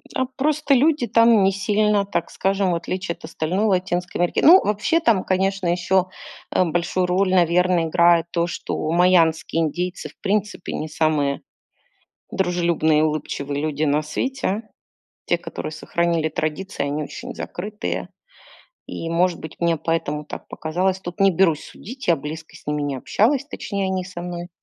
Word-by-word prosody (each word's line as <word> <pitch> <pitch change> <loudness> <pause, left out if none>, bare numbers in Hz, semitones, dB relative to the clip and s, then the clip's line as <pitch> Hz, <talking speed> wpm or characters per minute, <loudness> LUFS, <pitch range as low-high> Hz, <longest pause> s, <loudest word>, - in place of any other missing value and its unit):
А 260 - +1
просто 295 0 +1
люди 285 -1 +3
там 230 -2 +5
не 195 - +4
сильно, 205 +1 +1
так 170 -4 -2
скажем, 195 -1 0
в - - +1
отличие 180 +1 -3
от - - -12
остальной 175 +6 -1
Латинской 180 -3 -1
Америки 175 - +1
Ну, 360 +5 +9
вообще, 210 +11 +1
там, 230 - +2
конечно, 190 0 0
ещё, 180 +2 +2 0.4
э, - - +3
большую 175 +2 0
роль, 185 +1 +1
наверно, 180 -1 +3
играет 170 0 +4
то, 170 0 0
что 155 -1 -3
майамские 165 -2 +3
индийцы 175 +4 -3
в - - -20
принципе 210 -2 -2
не 155 - -3
самые 150 -3 0 0.9
дружелюбные 170 -4 +2
и - - +3
улыбчивые 145 -2 -2
люди 155 0 -1
на 150 +1 +2
свете. 220 - -2 0.6
Те, - - +2
которые - - -6
сохранили 170 -2 0
традиции, 155 +4 -3
они 145 +1 -2
очень - - -8
закрытые. 210 +4 -5 0.8
И, 165 - -5
может 175 0 +1
быть, 160 0 -9
мне 170 -1 +2
поэтому 150 -2 -2
так - - -9
показалось. 185 +4 -1
Тут 175 +2 -8
не 195 0 +6
берусь 165 -3 +2
судить. 255 -1 -10
Я 170 - +5
близко 155 +3 -8
с - - -18
ними 150 0 -1
не 140 -2 -2
общалась, 255 - +1
точнее, 200 -8 -4
они 185 -1 -1
со 180 -1 -8
мной. 175 0 -6
180 Hz, 160 wpm, -22 LUFS, 160-195 Hz, 0.9 s, Ну